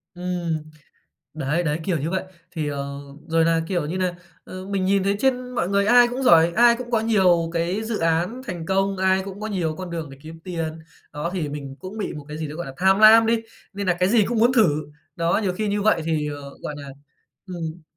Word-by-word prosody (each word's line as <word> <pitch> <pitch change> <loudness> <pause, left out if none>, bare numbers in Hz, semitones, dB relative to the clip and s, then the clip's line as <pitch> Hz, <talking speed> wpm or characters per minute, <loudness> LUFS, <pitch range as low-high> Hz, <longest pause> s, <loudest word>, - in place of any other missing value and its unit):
Ừm. 175 -3 -3 0.7
Đấy, 155 +3 0
đấy, 155 -1 -1
kiểu 175 -2 0
như 155 +4 -3
vậy. 190 - -1 0.3
Thì, 155 -4 -3
ờ, 140 -1 -5 0.3
rồi 165 0 +3
nà, 165 0 +2
kiểu 175 -6 -1
như 175 +5 -3
nà, 185 -1 0 0.3
ờ, 185 0 -8
mình 195 -1 -1
nhìn 195 +1 +2
thấy 200 +1 +1
trên 255 -1 0
mọi 180 - 0
người 200 0 +2
ai 245 +2 +6
cũng 250 +2 -4
giỏi, 170 -8 +6
ai 235 0 +6
cũng 240 0 -7
có 230 -2 +2
nhiều 185 -7 +3
cái 175 +5 -1
dự 220 -1 -2
án 165 +9 0
thành 175 -7 -5
công, 195 +1 +1
ai 190 0 +2
cũng 195 +1 -8
có 215 - -3
nhiều 175 -7 -2
con 185 0 -7
đường 160 -4 -5
để 135 - -12
kiếm 160 +1 -11
tiền. 165 -3 -4 0.3
Đó, 150 +3 -3
thì 170 -6 -2
mình 140 -2 -7
cũng 190 +3 -8
bị 210 - -3
một 150 -1 -8
cái 150 +1 -6
gì 160 - -3
đấy, 150 +1 -8
gọi 175 - -5
là, 135 - -7
tham 190 +3 +3
lam 220 +1 +8
đi, 230 0 +2 0.3
nên 200 0 -4
nà 175 -1 +2
cái 180 - +3
gì 215 -1 +4
cũng 235 -1 -1
muốn 240 +3 +4
thử. 230 -6 +5 0.5
Đó, 170 +3 +1
nhiều 190 - 0
khi 210 +3 -2
như 205 0 0
vậy 205 -6 +3
thì, 155 -2 -1
ờ, 145 -1 -7
gọi 150 - -4
nà 140 -1 -9 0.6
ừm. 170 -2 -6
180 Hz, 240 wpm, -23 LUFS, 160-200 Hz, 0.7 s, lam